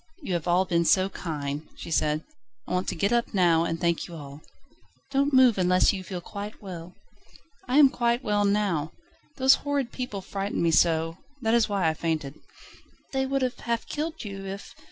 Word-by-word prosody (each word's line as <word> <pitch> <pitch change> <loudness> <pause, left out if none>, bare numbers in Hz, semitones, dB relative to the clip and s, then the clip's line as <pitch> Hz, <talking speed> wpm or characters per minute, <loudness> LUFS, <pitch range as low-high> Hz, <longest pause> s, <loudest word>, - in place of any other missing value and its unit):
"You 190 - -3
have 170 -1 -2
all 180 +2 +3
been 170 -1 +1
so 185 +3 +3
kind," 150 -4 -5
she - - -8
said, 155 0 +1 0.4
"I - - -7
want 180 +1 0
to - - -2
get 200 +7 +1
up 235 -2 0
now 170 -3 +4
and 165 0 -2
thank 170 -1 0
you 170 - -9
all." 145 -1 -10 0.7
"Don't 280 +1 +2
move 255 -6 +5
unless 180 +2 +4
you 190 -2 -5
feel 185 -1 -6
quite 205 +3 -7
well." 180 -3 -9 0.7
"I 255 +3 +2
am 290 -2 +8
quite 235 +1 0
well 205 0 +1
now. 200 -7 0 0.4
Those 265 0 +5
horrid 280 -4 -1
people 250 -6 -5
frightened 195 -1 -3
me 165 - +3
so, 165 0 +2 0.2
that 225 0 +2
is 235 -2 +3
why 195 -4 +1
I 160 - +2
fainted." 155 -4 -2 0.8
"They 265 -1 0
would 275 0 0
have 250 -1 -2
half 235 -1 -2
killed 315 +2 -4
you, 195 -1 -6
if 195 +1 -7
190 Hz, 195 wpm, -26 LUFS, 165-235 Hz, 0.8 s, am